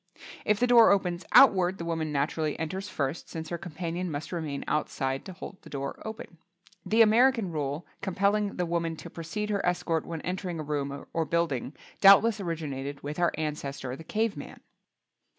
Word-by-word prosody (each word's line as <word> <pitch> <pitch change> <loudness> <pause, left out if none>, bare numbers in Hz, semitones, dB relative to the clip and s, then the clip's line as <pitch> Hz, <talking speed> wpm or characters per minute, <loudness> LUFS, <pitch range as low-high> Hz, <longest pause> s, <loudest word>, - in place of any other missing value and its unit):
If 210 -1 +2
the 245 - +4
door 240 -2 +7
opens 180 -3 +1
outward 190 -7 +6
the 170 - -5
woman 160 -2 -2
naturally 150 +1 -1
enters 185 +5 -4
first, 140 -2 -3
since 160 -1 -6
her 170 - -3
companion 175 0 -4
must 145 -1 -5
remain 155 -5 -4
outside 135 -3 -1
to 190 - -7
hold 190 +1 -9
the - - -13
door 140 -1 -5
open. 220 -6 -8 0.4
The 225 +1 +5
American 225 -2 +4
rule 145 0 -3 0.2
compelling 200 +2 +1
the 180 - 0
woman 165 -1 -1
to - - -10
precede 210 +6 -4
her 200 - 0
escort 170 -2 0
when 165 -2 -5
entering 180 -2 -4
a - - -3
room 140 -1 -3
or 165 -1 0
building 155 -4 -1 0.2
doubtless 200 +2 +7
originated 145 -6 -4
with 150 +3 -5
our 175 - +3
ancestor 140 -4 -4
the 160 - -10
cave 225 +1 -1
man. - - -9
170 Hz, 175 wpm, -28 LUFS, 150-195 Hz, 0.4 s, door